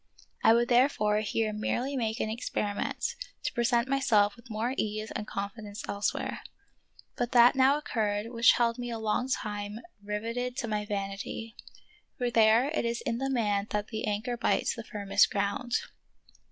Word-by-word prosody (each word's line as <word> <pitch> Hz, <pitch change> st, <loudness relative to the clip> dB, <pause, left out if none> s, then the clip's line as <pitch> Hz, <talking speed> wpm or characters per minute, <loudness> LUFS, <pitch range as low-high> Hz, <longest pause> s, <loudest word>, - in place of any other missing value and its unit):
I 225 Hz, -, +7 dB
would 235 Hz, +1 st, +3 dB
therefore 240 Hz, -4 st, +3 dB
here 215 Hz, +1 st, -1 dB
merely 245 Hz, +6 st, -1 dB
make 225 Hz, -3 st, -1 dB
an 220 Hz, 0 st, -1 dB
experi 210 Hz, -3 st, -2 dB
ment, -, -, -2 dB, 0.3 s
to -, -, -2 dB
present 240 Hz, 0 st, +2 dB
myself 230 Hz, -7 st, +3 dB
with 235 Hz, 0 st, -17 dB
more 225 Hz, +3 st, -1 dB
ease 215 Hz, -1 st, -2 dB
and 210 Hz, -, -4 dB
con 200 Hz, 0 st, -3 dB
fidence 210 Hz, 0 st, -8 dB
elsewhere. 200 Hz, +1 st, -2 dB, 0.8 s
But 245 Hz, +1 st, -2 dB
that 240 Hz, 0 st, +7 dB
now 265 Hz, +2 st, +5 dB
occurred 215 Hz, -6 st, -2 dB
which 235 Hz, 0 st, +6 dB
held 235 Hz, 0 st, +1 dB
me 245 Hz, 0 st, -4 dB
a 230 Hz, -, -3 dB
long 220 Hz, +4 st, -1 dB
time 205 Hz, -3 st, -3 dB, 0.3 s
riveted 230 Hz, +5 st, -3 dB
to 255 Hz, -5 st, -2 dB
my 210 Hz, -1 st, -2 dB
vanity; 205 Hz, +2 st, -4 dB, 0.6 s
for 245 Hz, -2 st, -1 dB
there 225 Hz, +4 st, +5 dB
it 310 Hz, -, -1 dB
is 235 Hz, 0 st, -1 dB
in 235 Hz, 0 st, -2 dB
the 270 Hz, 0 st, -1 dB
man 210 Hz, -5 st, 0 dB
that 210 Hz, 0 st, -2 dB
the 220 Hz, -2 st, -3 dB
anchor 215 Hz, +4 st, -2 dB
bites -, -, +1 dB
the 230 Hz, -, -7 dB
firmest 200 Hz, -1 st, +2 dB
ground. 205 Hz, +4 st, -1 dB
225 Hz, 170 wpm, -29 LUFS, 210-240 Hz, 0.8 s, I